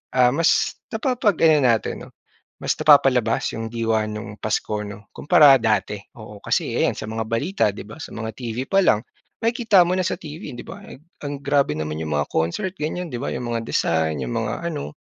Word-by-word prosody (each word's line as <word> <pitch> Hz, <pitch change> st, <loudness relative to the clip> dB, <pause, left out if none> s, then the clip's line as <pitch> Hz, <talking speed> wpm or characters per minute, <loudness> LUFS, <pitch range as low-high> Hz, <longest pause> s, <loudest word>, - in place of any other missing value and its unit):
ah, 125 Hz, -1 st, +5 dB
mas 165 Hz, +2 st, +2 dB
napapag 220 Hz, -, 0 dB
ano 155 Hz, -2 st, +6 dB
natin 115 Hz, -3 st, +1 dB
'no, -, -, -15 dB, 0.5 s
mas -, -, 0 dB
napapalabas 130 Hz, -6 st, +4 dB
yung 115 Hz, 0 st, -5 dB
diwa 115 Hz, -2 st, 0 dB
nung 105 Hz, 0 st, -6 dB
Pasko 105 Hz, 0 st, -2 dB
'no 105 Hz, 0 st, -10 dB
kumpara 145 Hz, -1 st, +6 dB
dati. 110 Hz, -3 st, 0 dB, 0.2 s
Oo, 105 Hz, -2 st, -11 dB
kasi -, -, 0 dB
ayan -, -, +2 dB
sa 110 Hz, -, -5 dB
mga 110 Hz, 0 st, -3 dB
balita 130 Hz, -, -1 dB
'di -, -, -9 dB
ba, 115 Hz, -, -10 dB
sa -, -, -8 dB
mga 110 Hz, -1 st, -5 dB
TV 120 Hz, 0 st, -4 dB
pa 195 Hz, 0 st, +4 dB
lang, 110 Hz, -4 st, +3 dB, 0.4 s
makikita 230 Hz, -6 st, +4 dB
mo 175 Hz, -, -1 dB
na -, -, +1 dB
sa -, -, -1 dB
TV 155 Hz, -, -9 dB
'di -, -, -8 dB
ba 200 Hz, -, -9 dB, 0.4 s
ang 145 Hz, 0 st, -4 dB
grabe 140 Hz, -, +2 dB
naman 75 Hz, 0 st, -4 dB
yung 75 Hz, -2 st, -2 dB
mga 75 Hz, -, +1 dB
concert 85 Hz, -, -1 dB
ganyan 165 Hz, +1 st, -3 dB
'di 120 Hz, -, -4 dB
ba, -, -, -3 dB
yung 120 Hz, -1 st, -4 dB
mga 115 Hz, -1 st, -3 dB
design, 80 Hz, -4 st, 0 dB
yung -, -, -4 dB
mga -, -, -4 dB
ano, 75 Hz, +1 st, -5 dB
115 Hz, 200 wpm, -22 LUFS, 105-150 Hz, 0.5 s, ano